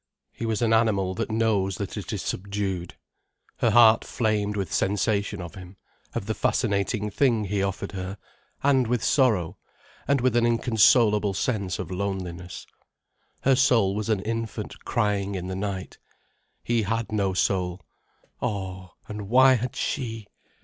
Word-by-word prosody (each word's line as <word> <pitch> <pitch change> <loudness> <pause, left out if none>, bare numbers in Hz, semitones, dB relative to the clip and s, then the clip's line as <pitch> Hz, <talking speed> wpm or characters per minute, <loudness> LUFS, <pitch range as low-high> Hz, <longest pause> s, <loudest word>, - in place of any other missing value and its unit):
He 115 - -5
was 110 +1 0
an 115 -1 +3
animal 100 -5 +2
that 95 - -3
knows 105 -4 +1
that 100 -2 -5
it 100 -5 -5
is 105 -3 -3
subdued. 95 -2 -3 0.6
Her - - +2
heart 115 -1 +6
flamed 105 -3 -1
with 95 -5 -3
sensation 100 -1 0
of 85 - -9
him, 95 +1 -11 0.4
of - - -2
the 110 - -1
fascinating 105 -1 0
thing 115 -1 +2
he 100 0 -1
offered 100 0 -2
her, 95 +1 -5 0.5
and 135 -3 +3
with 120 -1 0
sorrow, 110 - +2 0.5
and 140 -1 +3
with 125 -1 +1
an 120 - +4
inconsolable 115 -3 +3
sense 100 -4 -1
of 90 -1 -6
loneliness. 90 -2 -4 0.8
Her 135 0 +4
soul 120 -7 +3
was 105 +1 -3
an 105 -3 +1
infant 115 -1 -5
crying 100 -1 0
in 90 0 -4
the 95 - -3
night. 95 -1 -4 0.6
He 120 -1 +1
had 110 +1 -2
no 100 -3 0
soul. 90 -1 0 0.6
Oh, 95 -3 -4
and 105 -2 -6
why 130 +2 +7
had 125 0 -2
she? 115 -6 -3
105 Hz, 150 wpm, -25 LUFS, 95-115 Hz, 0.8 s, why